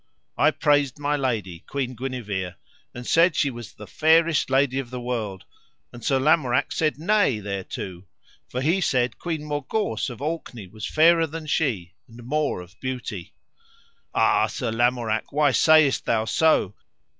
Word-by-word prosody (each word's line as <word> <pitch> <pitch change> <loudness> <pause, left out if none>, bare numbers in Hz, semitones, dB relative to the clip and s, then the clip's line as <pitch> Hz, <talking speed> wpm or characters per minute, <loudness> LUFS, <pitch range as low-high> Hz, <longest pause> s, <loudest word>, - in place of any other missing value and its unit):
I - - +4
praised 145 -2 +1
my 145 0 0
lady, 110 -11 -2
Queen 130 -2 -3
Guenever, 105 -8 -4 0.4
and 120 0 -9
said 165 +4 +4
she 140 - +1
was 120 -2 -9
the 105 - -11
fairest 160 +4 +3
lady 135 0 +2
of 130 -3 -5
the 125 0 -6
world, 115 -6 -4 0.5
and 120 -2 -11
Sir 135 - +2
Lamorak 135 -3 +2
said 155 -2 0
nay 175 - +2
thereto, 95 -2 -6 0.4
for 125 - -3
he 165 +7 +1
said 125 -7 0
Queen 160 -3 -3
Morgawse 145 - -2
of 120 - -9
Orkney 145 -7 -5
was 105 +3 -7
fairer 165 +1 +4
than 160 +1 -7
she 115 - -1
and 120 +1 -13
more 150 -6 -1
of 90 +1 -16
beauty. 130 -1 -5 0.8
Ah, - - +3
Sir 125 -5 -3
Lamorak, 115 -1 0
why 145 -1 +3
sayest 155 0 +4
thou 110 -1 +1
so? 155 - +2
130 Hz, 155 wpm, -24 LUFS, 115-150 Hz, 0.8 s, I